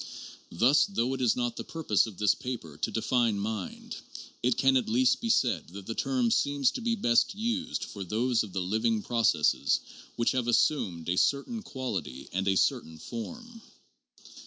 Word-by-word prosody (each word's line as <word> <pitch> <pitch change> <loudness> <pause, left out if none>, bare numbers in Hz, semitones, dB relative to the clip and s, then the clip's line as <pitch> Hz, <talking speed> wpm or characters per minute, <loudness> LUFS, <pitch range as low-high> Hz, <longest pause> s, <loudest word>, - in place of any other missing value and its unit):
Thus, 125 - +4
though 130 -10 -1
it 130 - -4
is 120 -3 +3
not 120 -1 -2
the - - -4
purpose 145 -11 +1
of 105 -5 -10
this 105 -2 +3
paper 115 - -6
to 80 - -2
define 115 0 +1
mind, 105 -1 -5 0.4
it 125 0 +1
can 135 -1 +4
at 130 - +1
least 125 +3 +3
be 230 - -2
said 120 - +2
that 100 -1 -8
the 115 - -4
term 125 -2 0
seems 140 0 +2
to - - -5
be 230 0 0
best 120 - +2
used 235 +4 -2
for 100 - -6
those 115 +5 +1
of 105 - -5
the 95 - -2
living 110 +3 0
processes 115 -10 +2 0.4
which 115 - +1
have 125 -2 -1
assumed 100 - +1
a 90 +1 0
certain 145 - +1
quality 95 - -5
and 95 +1 -1
a 95 - +3
certain 80 -3 0
form. 230 - -8
120 Hz, 180 wpm, -29 LUFS, 100-135 Hz, 0.4 s, Thus